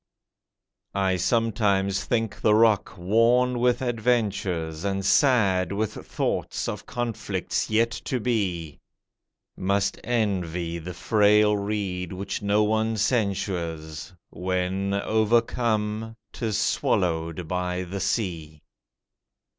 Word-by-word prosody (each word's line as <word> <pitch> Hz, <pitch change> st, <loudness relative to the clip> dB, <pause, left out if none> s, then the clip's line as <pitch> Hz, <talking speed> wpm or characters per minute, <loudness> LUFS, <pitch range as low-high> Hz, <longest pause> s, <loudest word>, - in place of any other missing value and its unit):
I 95 Hz, -1 st, +2 dB
sometimes 100 Hz, -2 st, +1 dB
think 115 Hz, -3 st, -1 dB
the 105 Hz, -1 st, +4 dB
rock 110 Hz, -3 st, +3 dB
worn 120 Hz, +7 st, +3 dB
with 125 Hz, +1 st, +2 dB
adventures, 100 Hz, -9 st, -1 dB
And 95 Hz, -1 st, -1 dB
sad 95 Hz, -, +3 dB
with 105 Hz, +1 st, -1 dB
thoughts -, -, -3 dB
of -, -, -5 dB
conflicts 120 Hz, -3 st, -2 dB
yet 115 Hz, +2 st, +2 dB
to 130 Hz, -, -1 dB
be, 95 Hz, -, -2 dB, 0.8 s
Must 100 Hz, +1 st, 0 dB
envy 90 Hz, -7 st, -1 dB
the 90 Hz, +2 st, -7 dB
frail 105 Hz, +2 st, +4 dB
reed 100 Hz, -4 st, -3 dB
which 100 Hz, +3 st, -4 dB
no 105 Hz, +1 st, +2 dB
one 110 Hz, +1 st, +1 dB
censures, 95 Hz, -, -2 dB, 0.2 s
When, 95 Hz, +2 st, -1 dB
overcome, 110 Hz, 0 st, 0 dB, 0.2 s
'tis 110 Hz, -3 st, -2 dB
swallowed 85 Hz, -1 st, 0 dB
by 90 Hz, +1 st, -2 dB
the 95 Hz, +2 st, -5 dB
sea. 80 Hz, -9 st, -2 dB
100 Hz, 100 wpm, -25 LUFS, 90-110 Hz, 0.8 s, the